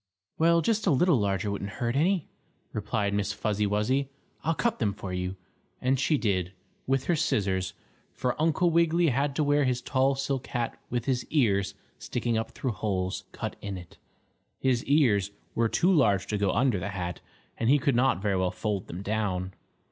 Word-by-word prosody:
"Well, 170 +1 +5
just 220 +2 +1
a - - +6
little 150 -1 +4
larger 100 0 0
wouldn't 100 0 -4
hurt 120 0 -1
any," 175 +4 +2 0.5
replied 105 -1 -1
Miss 100 0 0
Fuzzy 105 0 0
Wuzzy. 125 +7 +1 0.3
"I'll 165 +1 +1
cut 235 +5 0
them 105 -5 +1
for 95 -2 -6
you," 90 +1 -2 0.4
and 130 +1 +1
she 150 +3 +2
did, 95 -6 0 0.3
with 135 0 +1
her 175 - +1
scissors. 95 - 0 0.4
For 125 -1 -1
Uncle 165 +2 +3
Wiggily 170 0 +3
had 140 +2 0
to 155 - +2
wear 145 0 +3
his 125 -2 +1
tall 135 +2 +1
silk 135 -1 -2
hat 120 -2 -3
with 120 -1 -2
his 130 -2 0
ears 100 -10 +1 0.2
sticking 120 -1 -2
up 110 0 -1
through 130 - -3
holes 95 -2 -2
cut - - -5
in 100 -2 -4
it. 90 -2 -12 0.6
His 125 -3 +1
ears 120 -10 +3 0.2
were 115 0 +1
too 180 +9 +3
large 105 - +3
to 105 - 0
go 100 -1 +2
under 120 -1 +2
the 95 - -3
hat, 90 -4 -4 0.4
and 115 - +1
he 145 - +6
could 140 -2 +1
not 120 -6 +2
very 100 -2 +1
well 95 0 +1
fold 105 0 -3
them 90 +4 -6
down. 95 -3 -1
115 Hz, 185 wpm, -28 LUFS, 100-140 Hz, 0.6 s, a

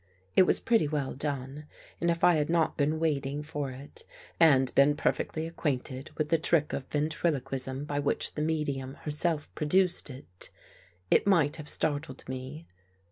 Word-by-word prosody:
It 185 - +6
was - - +6
pretty 225 -10 +2
well 145 -3 -2
done 140 +1 -4 0.3
and 170 - +1
if 170 0 -1
I 175 - +7
had 150 -1 0
not 165 -1 +1
been 150 +2 0
waiting 145 -2 -1
for 145 -3 -4
it 130 +2 -8 0.4
and 135 -6 +5
been 140 +2 +4
perfectly 155 +1 -1
acquainted 135 -4 -3
with 155 -1 -1
the 165 0 +3
trick 160 -2 +2
of 135 - -4
ventriloquism 140 -3 -1
by 145 -1 -2
which 145 - 0
the 150 - -4
medium 145 -4 -2
herself 150 0 -2
produced 180 +2 +3
it, 130 -9 -6 0.6
it - - +4
might 160 -6 +3
have 155 -2 -3
startled 145 -2 -1
me. 130 +5 -7
150 Hz, 160 wpm, -29 LUFS, 135-160 Hz, 0.6 s, I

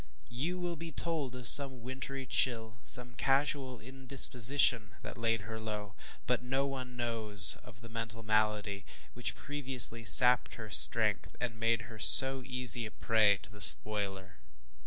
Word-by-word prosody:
ŌĆØ 60 - -29 0.2
You 160 +10 -8
will 175 -1 -9
be 165 +1 -13
told 155 -8 -7
of 125 -2 -9
some 135 -2 +6
wintry 130 +1 -11
chill, 115 -4 -4
some 125 +1 0
casual 135 0 -5
indisposition, 125 -3 0
that - - -12
laid 115 -1 -6
her 110 +2 -12
low; 105 -2 -11 0.3
but 125 -1 -5
no 135 +2 -6
one 130 -2 -11
knows 110 -4 +2
of 110 -4 -19
the 115 - -16
mental 115 0 -11
malady 105 -2 -5 0.3
which 120 - -7
previously 130 -5 +2
sapped 125 +4 +6
her 110 -2 -14
strength, 70 -7 -1
and 115 -2 -9
made 115 0 -4
her 115 -1 -17
so 130 +3 +6
easy 125 -2 0
a - - -14
prey 105 -2 -3
to - - -18
the 105 0 -14
spoiler. 100 -1 0
120 Hz, 155 wpm, -27 LUFS, 110-130 Hz, 0.3 s, some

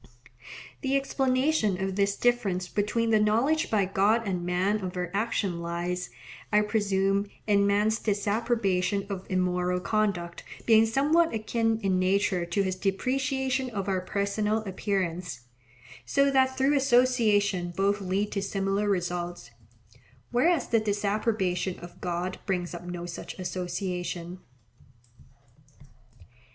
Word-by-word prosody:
The 270 0 +1
explanation 265 - +1
of 190 0 -2
this 200 0 +1
difference 205 -7 +1
between 225 +4 0
the 215 - +5
knowledge 235 +10 +2
by 205 -3 +2
God 205 +4 +2
and 180 -3 -2
man 185 +4 +1
of 180 0 -4
our 180 -1 -3
actions 205 -2 0
lies, 175 +1 -3 0.4
I 210 0 +5
presume, 200 -2 +1 0.2
in 200 -1 +3
man's 210 +2 +2
disapprobation 205 -2 0
of 190 -1 -5
immoral 180 -1 0
conduct 180 -3 -1 0.2
being 225 -1 +6
somewhat 295 +5 +2
akin 225 +1 0
in 190 -2 +1
nature 185 -1 +1
to 195 +4 +1
his 185 -1 -2
depreciation 260 +6 -1
of 205 -4 -4
our 190 -2 0
personal 210 +3 -1
appearance, 180 - -3 0.6
so 275 - +2
that 260 -1 +2
through 270 +2 +3
association 230 -8 +3
both 200 +1 +1
lead 195 +2 -1
to 200 - -2
similar 195 +1 -1
results; 175 -8 -2 0.8
whereas 275 +4 +2
the 230 - +4
disapprobation 205 -3 -1
of 175 0 -12
God 180 +1 -3
brings 180 -3 -1
up 175 0 -8
no 175 -1 -5
such 175 - -7
association. 180 -1 -4
200 Hz, 125 wpm, -27 LUFS, 180-225 Hz, 0.8 s, being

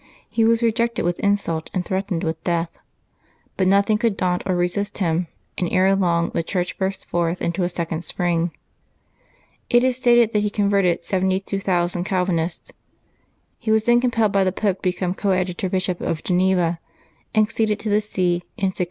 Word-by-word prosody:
He 225 - 0
was 230 +1 +3
rejected 235 0 +1
with 175 0 -1
in 200 0 +3
sult 165 -5 -4
and 180 -1 -1
threatened 190 -2 -2
with 160 0 -3
death. 170 -1 0 0.8
But 185 - +1
nothing 200 +2 +3
could 225 -4 0
daunt 180 -1 0
or 185 - +1
resist 180 +4 -1
him, 170 -2 0 0.3
and 175 - -1
ere 190 +1 +4
long 170 -3 +1
the - - 0
Church 180 +2 -2
burst 190 0 -2
forth 170 0 -1
into 170 +2 -1
a 175 - +1
second 170 -2 -3
spring. 175 -2 0 1.2
It 240 0 +4
is 255 -1 +1
stated 240 -3 +4
that 210 - +2
he 210 - 0
converted 200 -4 +1
72,000 190 -2 0
Cal 185 -1 0
vinists. 170 -2 -2 0.9
He 230 - -5
was 220 0 +3
then 240 +1 +4
compelled 230 -4 +2
by 195 -1 +3
the 185 - +1
Pope 195 0 0
to - - -31
become 180 0 -2
Coadjutor 185 -2 -1
Bishop 185 -1 -1
of 165 -2 -2
Geneva, 180 -2 +1 0.6
and 215 0 +5
succeeded 215 -1 0
to 220 - -3
the 210 +1 +3
see 185 -4 0 0.2
in 195 - +1
1602. 185 - -9
190 Hz, 180 wpm, -22 LUFS, 175-210 Hz, 1.2 s, and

